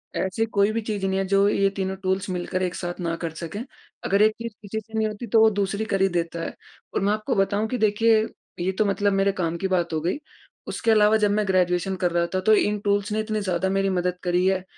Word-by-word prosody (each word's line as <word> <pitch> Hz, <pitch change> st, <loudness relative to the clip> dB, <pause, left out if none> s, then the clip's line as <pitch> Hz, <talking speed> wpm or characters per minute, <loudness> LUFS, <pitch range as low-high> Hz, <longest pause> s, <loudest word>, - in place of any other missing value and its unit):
ऐसी 190 Hz, +4 st, 0 dB
कोई 205 Hz, -1 st, +2 dB
भी 230 Hz, +1 st, -1 dB
चीज़ 210 Hz, -3 st, -3 dB
नहीं 190 Hz, 0 st, 0 dB
है, 195 Hz, -, 0 dB
जो 195 Hz, +1 st, +4 dB
ये 195 Hz, -1 st, +2 dB
तीनों 190 Hz, -1 st, -3 dB
टूल्स 190 Hz, +1 st, -1 dB
मिलकर 180 Hz, 0 st, -2 dB
एक 180 Hz, -1 st, -2 dB
साथ 175 Hz, 0 st, -5 dB
ना 170 Hz, -2 st, -2 dB
कर 165 Hz, 0 st, -4 dB
सकें, 170 Hz, +7 st, -6 dB, 0.4 s
अगर 200 Hz, +1 st, +2 dB
एक 215 Hz, +1 st, +6 dB
चीज़ 230 Hz, -1 st, -4 dB
किसी 210 Hz, +1 st, -4 dB
से 220 Hz, +1 st, -18 dB
नहीं 220 Hz, 0 st, +2 dB
होती 215 Hz, +3 st, -6 dB
तो 225 Hz, +1 st, +4 dB
वो 220 Hz, -, +7 dB
दूसरी 200 Hz, +1 st, -1 dB
कर 195 Hz, -3 st, -1 dB
ही 195 Hz, -, +5 dB
देता 170 Hz, -1 st, -2 dB
है। -, -, -4 dB, 0.4 s
और -, -, 0 dB
मैं 205 Hz, +1 st, +2 dB
आपको 215 Hz, 0 st, -2 dB
बताऊँ 200 Hz, +2 st, +1 dB
कि 250 Hz, -, -2 dB
देखिए, 220 Hz, 0 st, +3 dB, 0.3 s
ये 180 Hz, +2 st, 0 dB
तो 205 Hz, +3 st, 0 dB
मतलब 200 Hz, 0 st, +1 dB
मेरे 195 Hz, 0 st, +2 dB
काम 170 Hz, -3 st, -2 dB
की 190 Hz, -, -1 dB
बात 175 Hz, -3 st, 0 dB
हो 160 Hz, -, +1 dB
गई 175 Hz, -, -1 dB, 0.5 s
उसके 225 Hz, -, 0 dB
अलावा 215 Hz, 0 st, +5 dB
जब 210 Hz, -1 st, +2 dB
मैं 210 Hz, 0 st, +1 dB
ग्रेजुएशन 185 Hz, 0 st, +1 dB
कर 180 Hz, -1 st, 0 dB
रहा 170 Hz, 0 st, +1 dB
था। -, -, +2 dB
तो 220 Hz, -, +6 dB
इन 210 Hz, 0 st, +2 dB
टूल्स 205 Hz, 0 st, +1 dB
ने 215 Hz, -, 0 dB
इतनी 215 Hz, 0 st, -1 dB
ज़्यादा 185 Hz, -1 st, 0 dB
मेरी 195 Hz, 0 st, +1 dB
मदद 180 Hz, -1 st, -1 dB
करी 180 Hz, +1 st, +1 dB
है 190 Hz, -1 st, +1 dB
195 Hz, 255 wpm, -24 LUFS, 185-210 Hz, 0.5 s, वो